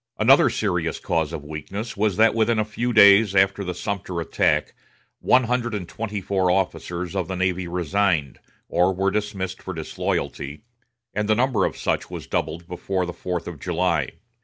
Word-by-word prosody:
Another 130 +6 +6
serious 85 -6 -1
cause 80 -2 -1
of 75 -3 -6
weakness 95 +10 -6
was 105 -2 0
that 110 0 +5
within 115 0 +2
a 110 - +1
few 120 +3 -2
days 100 -1 +7
after 95 +1 +3
the 90 -1 -4
Sumter 95 -2 -4
attack 80 - +1 0.5
one 130 0 +4
hundred 120 -1 -1
and 90 -4 -5
twenty 105 0 -4
four 95 -1 +1
officers 90 -1 -1
of 95 -3 -1
the 95 - -3
navy 90 -1 -1
resigned, 90 -3 0 0.3
or 90 +2 +2
were 95 +1 +1
dismissed 100 -3 -3
for 95 - -6
disloyalty, 75 -1 -3 0.5
and 105 0 -2
the 110 - +5
number 120 -5 +2
of - - -3
such - - -1
was - - -7
doubled 80 +3 -3
before 90 +1 -2
the 90 - -5
fourth 90 0 -4
of 85 -5 -7
July. 85 -3 0
95 Hz, 175 wpm, -23 LUFS, 85-105 Hz, 0.5 s, days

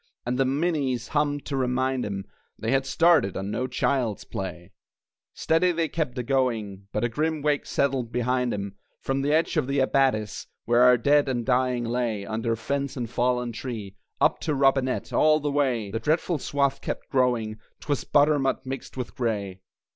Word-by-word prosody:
And 125 +2 -1
the 135 - +4
minies 135 -4 0
hummed 145 -1 0
to 140 - -3
remind 130 -1 0
'em 100 -1 -4 0.3
They 110 - -2
had 135 0 +1
started 160 - +3
on 95 +1 -4
no 125 +4 -1
child's 125 -6 0
play! 90 -2 -6 0.6
Steady 170 +3 +2
they 165 -2 -1
kept 150 -6 -2
a 125 - -1
going, 115 -7 -1
But 105 - -1
a - - +3
grim 155 +5 -1
wake 150 -1 +1
settled 135 -4 0
behind 125 0 0
'em 100 -1 -4 0.3
From 135 0 -1
the 145 +2 0
edge 160 +2 +2
of - - +1
the 140 +1 -1
abattis 130 -6 +1 0.2
(Where 120 +1 +3
our 125 0 +7
dead 145 +3 +3
and 120 -3 -1
dying 125 -1 +1
lay 115 -4 -1
Under 115 +2 -1
fence 140 +5 -3
and 120 -2 -2
fallen 125 +1 0
tree), 115 -4 -6 0.2
Up - - +3
to 150 - -1
Robinett, 135 -1 +1
all 155 0 +4
the 145 -1 -2
way 125 -8 0
The 115 - -2
dreadful 160 +5 0
swath 140 0 0
kept - - -5
growing! 120 -5 +1 0.2
'Twas 145 -3 -1
butternut 145 -3 +2
mixed 135 +1 -6
with 125 - -4
gray. 100 -6 -2
130 Hz, 175 wpm, -26 LUFS, 115-140 Hz, 0.6 s, our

